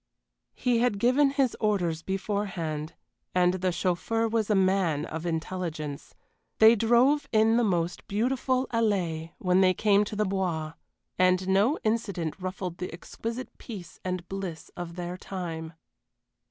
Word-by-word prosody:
He 245 -3 +1
had 240 -4 +2
given 255 +6 +4
his 275 -3 +1
orders 180 -7 0
beforehand 185 -5 -3 0.4
and 180 0 +4
the 185 0 0
chauffeur 185 +6 0
was 225 -1 0
a 210 - +3
man 185 -6 +2
of 160 +2 -5
intelligence. 160 -3 -4 0.4
They 220 +1 +8
drove 240 +7 +3
in 220 0 +4
the 240 - +3
most 175 -4 -1
beautiful 255 +4 0
allée 175 -8 0
when 185 0 +3
they 185 -1 +4
came 205 0 +4
to 210 - -6
the 210 0 +1
Bois 175 -5 -2 0.5
and 185 0 +3
no 200 +10 +3
incident 200 -7 -1
ruffled 185 -1 -5
the 180 - -4
exquisite 230 +8 -6
peace 200 -8 -9
and 180 -1 -3
bliss 190 -5 -6
of 170 -1 -6
their 175 0 -5
time. 170 -4 -5
190 Hz, 140 wpm, -28 LUFS, 175-220 Hz, 0.5 s, They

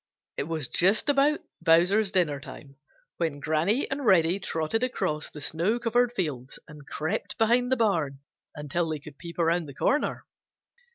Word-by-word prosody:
It - - -2
was 160 -5 -2
just 195 - +3
about 285 +2 +3 0.2
Bowser's 180 +5 +4
dinner 155 -6 +1
time 140 0 -11 0.4
when 160 -4 -2
Granny 160 - +1
and 280 +1 -2
Reddy 185 -4 +4
trotted 160 +5 -2
across 155 -11 -1
the 150 - -10
snow 170 - 0
covered 240 +1 +1
fields 145 - -4
and 150 -1 -13
crept 155 +1 -3
behind 245 +3 +2
the 260 - +3
barn 165 -12 0 0.4
until 155 +3 -2
they 155 - -2
could 145 -1 -13
peep 170 -1 -9
around 170 -1 +1
the 140 - -10
corner. 290 - 0
170 Hz, 160 wpm, -27 LUFS, 150-225 Hz, 0.4 s, Bowser's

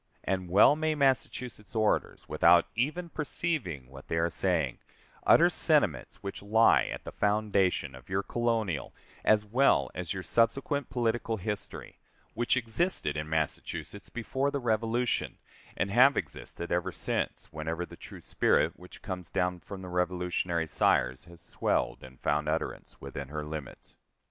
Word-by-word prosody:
And 95 -2 -2
well 100 +10 +7
may 155 0 0
Massachusetts 125 -5 -1
orators, 110 -1 0
without 85 0 +5
even 155 +9 -1
perceiving 145 - -3
what 65 +1 -13
they 80 - -1
are 85 +1 +1
saying, 80 -9 0 0.5
utter - - +7
sentiments - - +1
which 100 - -5
lie 110 +3 +4
at - - -6
the - - -7
foundation 100 -8 +1
of 65 -1 -14
your 95 +1 0
colonial 110 - -1 0.3
as 105 -1 +4
well 105 - +3
as 90 -1 -5
your 95 -2 -3
subsequent 135 - +1
political 115 -2 0
history, 105 0 -6 0.3
which 120 +3 +1
existed 115 - 0
in 75 0 -4
Massachusetts 80 -1 -3
before 130 +4 -1
the 140 - -2
Revolution, 115 0 0 0.4
and 95 +2 0
have 130 +5 +6
existed 85 - -5
ever 85 0 0
since, - - -3
whenever 80 +3 -3
the - - -12
true - - -11
spirit - - +2
which - - -14
comes 90 -2 -5
down 90 0 0
from 95 +1 -9
the - - -7
Revolutionary 90 -1 -1
sires 65 -3 +1
has 85 -1 -14
swelled - - -1
and 65 0 -13
found 75 +1 +1
utterance 80 +1 -3
within 70 0 -6
her 75 +1 -5
limits. 75 -2 -8
95 Hz, 150 wpm, -29 LUFS, 80-120 Hz, 0.5 s, well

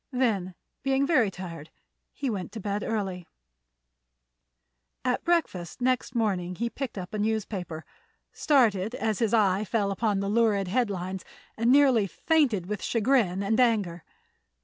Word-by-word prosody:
Then, 210 -9 0 0.3
being 270 +1 +1
very 265 -9 +3
tired, 170 -5 -8 0.4
he 280 - -4
went 210 -1 -4
early 200 -2 -2
to - - -14
bed. - - -31 1.8
At 250 -1 0
breakfast 290 - -1
next 255 0 0
morning 185 -6 0
he 235 +4 -2
picked 265 -6 -5
up 180 +1 -6
a 215 - -2
newspaper, 200 -6 -2 0.5
started 230 -6 +2
as 220 -5 -1
his 225 -3 +1
eye 205 -3 +3
fell 210 -2 0
upon 205 0 0
the 200 - -2
lurid 205 -3 +2
headlines, 190 -5 -1 0.3
and 230 +2 +2
nearly 260 -7 +5
fainted 255 - +1
with 210 +1 -4
chagrin 220 -5 +1
and 220 +4 +1
anger. 205 -9 +2
210 Hz, 140 wpm, -27 LUFS, 190-245 Hz, 1.8 s, nearly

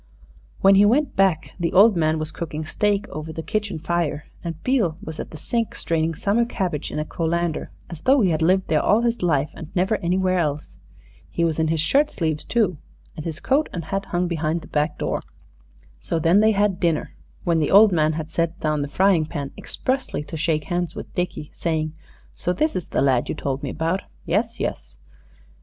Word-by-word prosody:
When 195 0 +7
he 195 +1 +6
went 255 +7 +3
back 190 -5 +2
the 170 -1 -1
old 205 +3 +7
man 160 -1 +2
was 155 0 -3
cooking 155 -2 -5
steak 205 +4 0
over 155 +2 -6
the 160 +1 -6
kitchen 205 -3 -2
fire, 160 -2 -1 0.2
and 165 -2 -4
Beale 220 -12 +1
was 160 -6 -8
at - - -5
the 155 - -9
sink 230 +6 -2
straining 165 0 0
summer 205 +8 +2
cabbage 185 - -3
in - - -4
a 150 - -1
colander, 170 0 -1 0.2
as 170 -3 -9
though 270 0 +4
he 190 -5 +3
had 160 0 0
lived 185 +3 +3
there 155 - +2
all 215 +3 +3
his 235 0 0
life 150 -5 +1
and 160 - -9
never 190 +4 +2
anywhere 185 +1 +1
else. 150 -3 -3 0.5
He 170 - -1
was 165 -1 +1
in 160 - +2
his 160 -1 +1
shirt 285 - +3
sleeves 160 - -2
too, 210 -10 0 0.4
and 155 - -7
his 165 -1 -4
coat 285 +4 +1
and 170 -4 -5
hat 195 +3 -2
hung 175 0 -1
behind 165 -1 -1
the 155 - -12
back 150 +1 0
door. - - -2 0.8
So 165 - -2
then 165 +5 +4
they 220 +1 +4
had 200 -2 +1
dinner, 170 -4 0 0.3
when 170 -2 +2
the 150 - +1
old 210 +2 +7
man 155 -2 +2
had 155 0 -5
set 170 0 -1
down 155 -1 0
the 145 - -2
frying 180 0 +3
pan 140 -2 -5
expressly 260 - -2
to 155 - -8
shake 155 -1 0
hands 175 0 -2
with - - -8
Dickie, 175 -4 -3
saying, 155 -2 -1 0.4
"So 180 - -1
this 310 +9 0
is 185 - -3
the - - 0
lad 130 -3 +2
you - - -1
told 135 0 -3
me - - -3
about. 165 +4 -1 0.2
Yes, 225 +6 0
yes." - - -4
170 Hz, 210 wpm, -23 LUFS, 155-195 Hz, 0.8 s, When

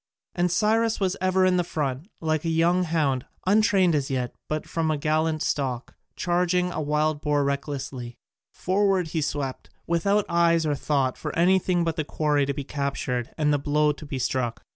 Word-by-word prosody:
And 175 0 +1
Cyrus 225 +3 +2
was 190 -2 0
ever 185 0 +3
in 185 -1 +3
the 175 - +2
front, 145 -2 -3
like 155 -1 0
a 165 - -1
young 170 +3 +2
hound, 150 -6 0 0.2
untrained 195 -3 +4
as 140 -3 0
yet 125 -2 -2 0.2
but 155 0 -1
bred - - -19
from 165 -1 0
a 155 - +1
gallant 155 +1 0
stock, 130 -4 -2 0.2
charging 180 0 +1
a 155 - -3
wild 150 0 0
boar 145 -1 +1
recklessly; 140 -3 -4 0.3
forward 190 -2 +1
he 160 0 -1
swept, 140 -3 -3 0.2
without 200 +5 +1
eyes 170 -1 +3
or 150 - +1
thought 135 -2 0
for - - -5
anything 180 0 +3
but 165 0 -2
the 155 - 0
quarry 145 -1 0
to - - 0
be 140 - -4
captured 135 -4 -3
and 150 -2 +2
the 145 - +1
blow 150 +1 +2
to 150 +1 -9
be 140 - -4
struck. 120 -2 -2
155 Hz, 185 wpm, -25 LUFS, 140-175 Hz, 0.3 s, untrained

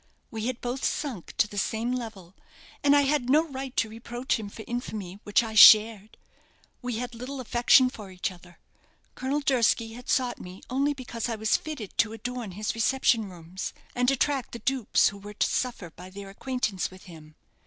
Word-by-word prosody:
We 220 0 -3
had 255 -2 -3
both 250 +2 -3
sunk 255 - -3
to - - +4
the 205 -1 -4
same 225 +5 -1
level, 215 -8 -6 0.5
and 285 0 +5
I 285 - +6
had 280 -3 +1
no 310 +4 +4
right 270 -2 -7
to 225 - +2
reproach 235 +3 -3
him 210 -2 -6
for 220 - -10
infamy 210 -6 -5
which 205 +3 +3
I 220 -1 -5
shared. 215 0 +7 0.6
We 245 -2 -3
had 245 +1 -4
little 255 +4 -6
affection 250 +1 +5
for 215 -5 -8
each 185 0 -3
other. 175 -1 -16 0.6
Colonel 275 +3 -2
Durski 230 -4 +2
had 245 +1 -11
sought 250 -2 +1
me 180 +1 -10
only 280 +3 +1
because 245 -3 -5
I 230 - -1
was 220 0 +1
fitted 285 -11 -5
to 220 -1 +3
adorn 235 -2 -5
his 210 +3 -2
reception 230 -2 +2
rooms, 175 +1 -7 0.2
and 250 0 +2
attract 275 -1 0
the - - -4
dupes 265 -5 +3
who 200 - -11
were 205 +1 -10
to - - +2
suffer 235 -9 -2
by 180 +3 -12
their 195 +1 -9
acquaintance 220 -3 -2
with 185 0 -15
him. 155 -4 -13
230 Hz, 190 wpm, -27 LUFS, 200-255 Hz, 0.6 s, shared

